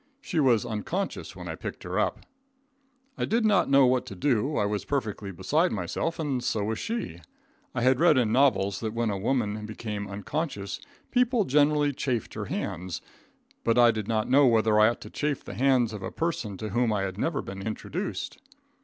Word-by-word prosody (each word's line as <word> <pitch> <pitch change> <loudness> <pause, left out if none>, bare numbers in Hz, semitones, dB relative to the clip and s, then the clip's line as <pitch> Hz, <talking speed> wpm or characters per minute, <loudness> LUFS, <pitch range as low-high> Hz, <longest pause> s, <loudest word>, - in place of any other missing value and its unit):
She 185 - -2
was 125 -7 +4
unconscious 140 - -3
when - - -8
I - - -3
picked - - -7
her - - -2
up. - - -1 0.9
I - - +1
did 230 +1 +1
not 195 -7 +3
know 135 -1 +6
what 125 0 +2
to 100 - -7
do, 130 +6 +1
I 105 - +2
was 105 0 -1
perfectly 110 -7 -3
beside 145 - +1
myself, 100 - -2
and 140 -6 -2
so 110 -4 0
was 110 +1 -2
she. 225 - -4 0.6
I 120 - 0
had 130 0 +4
read 165 -4 +5
in 115 -4 +2
novels 110 -7 +3
that 110 -1 -4
when 115 -2 0
a 100 - -2
woman 110 -2 0
became 105 -2 -5
unconscious 100 - -4 0.3
people 245 -3 +3
generally 145 0 +3
chafed 125 -4 -2
her - - -4
hands, 90 0 -4 0.6
but 115 +1 +2
I 120 -1 +7
did 110 -2 -4
not 110 -2 0
know 135 +2 +5
whether 110 -2 +4
I 110 +1 +7
ought 120 - -4
to - - -10
chafe 150 -2 -2
the - - -8
hands 125 -4 +2
of 105 - -6
a 95 - -4
person 140 - -3
to 110 +1 -5
whom 120 0 +1
I 100 -2 0
had 95 0 -4
never 165 - -1
been 95 0 -7
introduced. 155 - -4
120 Hz, 200 wpm, -27 LUFS, 105-145 Hz, 0.9 s, I